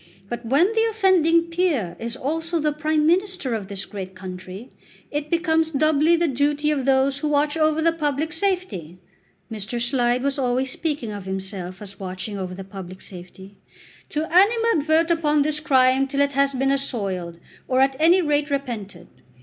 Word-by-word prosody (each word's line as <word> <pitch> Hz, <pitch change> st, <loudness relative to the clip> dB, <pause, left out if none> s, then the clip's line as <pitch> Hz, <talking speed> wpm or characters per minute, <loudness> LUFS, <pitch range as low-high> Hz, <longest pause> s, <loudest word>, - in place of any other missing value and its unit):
But 240 Hz, 0 st, -5 dB
when 285 Hz, -, +3 dB
the 450 Hz, 0 st, +2 dB
offending 365 Hz, -6 st, +3 dB
peer 335 Hz, -, -1 dB
is 230 Hz, +1 st, -4 dB
also 325 Hz, +5 st, -2 dB
the 300 Hz, 0 st, +1 dB
Prime 305 Hz, 0 st, 0 dB
Minister 365 Hz, -5 st, +1 dB
of 210 Hz, -4 st, -3 dB
this 195 Hz, -1 st, -4 dB
great 190 Hz, -2 st, -8 dB
country, 185 Hz, +4 st, -9 dB, 0.4 s
it 295 Hz, 0 st, -3 dB
becomes 325 Hz, -2 st, +1 dB
doubly 310 Hz, +2 st, +3 dB
the 340 Hz, 0 st, +1 dB
duty 290 Hz, +2 st, +1 dB
of 275 Hz, -4 st, -1 dB
those 270 Hz, 0 st, +2 dB
who 305 Hz, -, -2 dB
watch 295 Hz, +1 st, +1 dB
over 310 Hz, 0 st, +2 dB
the 330 Hz, -, +4 dB
public 310 Hz, 0 st, -2 dB
safety," 340 Hz, -, -2 dB, 0.5 s
Mr. 220 Hz, +2 st, -4 dB
Slide 240 Hz, +1 st, +1 dB
was 280 Hz, 0 st, -1 dB
always 255 Hz, 0 st, 0 dB
speaking 290 Hz, -9 st, -3 dB
of 205 Hz, -2 st, -7 dB
himself 190 Hz, 0 st, -5 dB
as 200 Hz, -1 st, -8 dB
watching 190 Hz, +2 st, -5 dB
over 185 Hz, -2 st, -5 dB
the 195 Hz, -, -7 dB
public 185 Hz, -1 st, -9 dB
safety, 190 Hz, +2 st, -12 dB, 0.5 s
"to 305 Hz, +1 st, -2 dB
animadvert 360 Hz, -6 st, +3 dB
upon 300 Hz, -3 st, +2 dB
his 300 Hz, 0 st, 0 dB
crime 265 Hz, -2 st, +3 dB
till 280 Hz, +1 st, -1 dB
it 280 Hz, 0 st, +1 dB
has 275 Hz, 0 st, +2 dB
been 270 Hz, +1 st, +1 dB
assoiled, 195 Hz, -11 st, -2 dB, 0.3 s
or 255 Hz, 0 st, +1 dB
at 270 Hz, 0 st, +3 dB
any 345 Hz, +4 st, +5 dB
rate 295 Hz, -1 st, +1 dB
repented. 245 Hz, -8 st, -4 dB
280 Hz, 170 wpm, -23 LUFS, 210-320 Hz, 0.5 s, any